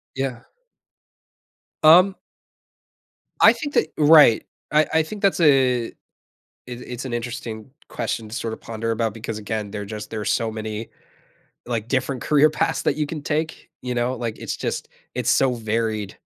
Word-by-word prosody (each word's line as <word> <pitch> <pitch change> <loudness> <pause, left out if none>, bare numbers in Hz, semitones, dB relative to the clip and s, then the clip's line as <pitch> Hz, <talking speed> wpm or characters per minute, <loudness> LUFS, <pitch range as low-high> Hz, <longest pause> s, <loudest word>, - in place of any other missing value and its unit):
Yeah. 130 -3 -3 1.4
Um 180 +5 +7 1.3
I - - +8
think 290 -2 -6
that 155 - +2
right, 150 -6 +7 0.3
I 155 +1 +4
I 160 - +4
think 200 +6 -8
that's 195 -2 +2
a 130 -6 +4
it - - -11 0.7
it's 125 0 -7
an 130 - -5
interesting 120 -1 -5 0.2
question 110 -2 -4
to 105 - -8
sorta 115 -2 -3
ponder 115 0 -5
about 115 -1 -1
because 115 -1 -5
again, 105 -1 -4
there's 105 0 -6
just 105 -1 -7
there's 105 -3 -2
so 115 -1 0
many, 110 0 -5 0.8
like, 115 -2 -3
different 130 0 -1
career 150 +1 +4
paths - - -1
that 140 - +1
you 150 -1 -1
can 150 -1 -6
take, 155 +2 -3
you 125 -1 -3
know? 120 +1 0
Like, 115 -2 -4
it's - - -4
just - - -4 0.3
it's 125 -1 0
so 130 -2 +3
varied. 110 -3 -2
120 Hz, 160 wpm, -22 LUFS, 110-145 Hz, 1.4 s, I